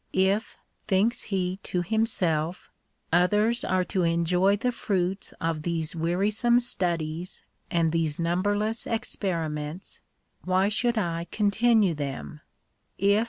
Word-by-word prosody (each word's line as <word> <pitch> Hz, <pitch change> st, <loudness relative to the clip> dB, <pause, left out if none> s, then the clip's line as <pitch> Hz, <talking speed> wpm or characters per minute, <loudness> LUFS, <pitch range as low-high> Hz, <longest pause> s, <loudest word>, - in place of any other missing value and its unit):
" -, -, -41 dB, 0.2 s
If/' 205 Hz, +3 st, -2 dB, 0.3 s
thinks 220 Hz, +5 st, +2 dB
he 185 Hz, -2 st, -2 dB
to 180 Hz, -2 st, -2 dB
himself, 180 Hz, -6 st, 0 dB, 0.2 s
" -, -, -47 dB, 0.2 s
others 210 Hz, +7 st, +3 dB
are 185 Hz, 0 st, +1 dB
to 185 Hz, +1 st, -1 dB
enjoy 175 Hz, +3 st, +3 dB
the 250 Hz, +4 st, 0 dB
fruits 190 Hz, -4 st, -2 dB
of 165 Hz, -1 st, -1 dB
these 165 Hz, -1 st, -2 dB
wearisome 205 Hz, +9 st, +2 dB
studies 175 Hz, -7 st, -2 dB, 0.3 s
and 165 Hz, -2 st, +2 dB
these 160 Hz, -3 st, 0 dB
number 180 Hz, +5 st, +1 dB
less 220 Hz, +2 st, -2 dB
experiments, 165 Hz, -7 st, -3 dB, 0.4 s
why 185 Hz, +2 st, +2 dB
should 235 Hz, +2 st, +1 dB
I 170 Hz, -4 st, -1 dB
continue 215 Hz, -2 st, +3 dB
them 145 Hz, 0 st, -5 dB
185 Hz, 120 wpm, -26 LUFS, 165-210 Hz, 0.4 s, others